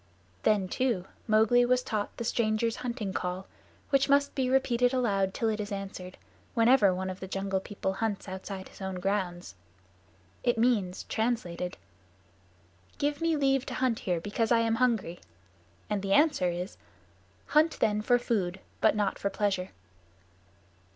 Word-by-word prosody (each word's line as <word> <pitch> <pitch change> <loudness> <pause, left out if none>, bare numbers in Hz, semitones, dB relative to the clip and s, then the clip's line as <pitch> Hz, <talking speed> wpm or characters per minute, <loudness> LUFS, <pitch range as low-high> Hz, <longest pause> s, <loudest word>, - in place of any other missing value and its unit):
Then, 205 -3 +2
too, 235 -4 0 0.2
Mowgli 220 +3 +5
was 250 +1 +2
taught 215 -4 -3
the 235 - -3
Strangers' 225 0 0
Hunting 235 -6 -4
Call, 180 +1 -3 0.5
which 275 0 +3
must 280 0 +3
be 260 -2 0
repeated 250 -1 +2
aloud 200 -6 +1
till 225 - -1
it 220 -1 0
is 205 0 -4
answered, 195 -2 -6 0.4
whenever 230 -3 +5
one 185 +1 -2
of 185 - -8
the 190 - -6
Jungle 195 0 -1
People 190 -1 -3
hunts 210 -1 -2
outside 190 0 -6
his - - -15
own 190 -1 -3
grounds. 180 - -2 0.9
It 240 -1 +2
means, 215 -6 +1
translated, 185 -6 -2 1.2
"Give 290 +1 -1
me 330 -1 +2
leave 270 -2 +2
to - - -4
hunt 255 -3 +1
here 180 -3 -1
because 210 +6 -1
I 230 -1 +5
am 225 0 +1
hungry." 225 -9 +1 0.7
And 210 -2 -1
the 195 0 0
answer 290 - +4
is, 175 +2 -5 0.7
"Hunt 310 +2 +3
then 210 -1 +2
for 245 +3 +4
food, 195 -7 -1 0.2
but 220 - +4
not 205 -2 0
for 200 - 0
pleasure." 195 -3 -1
210 Hz, 155 wpm, -29 LUFS, 190-245 Hz, 1.2 s, Mowgli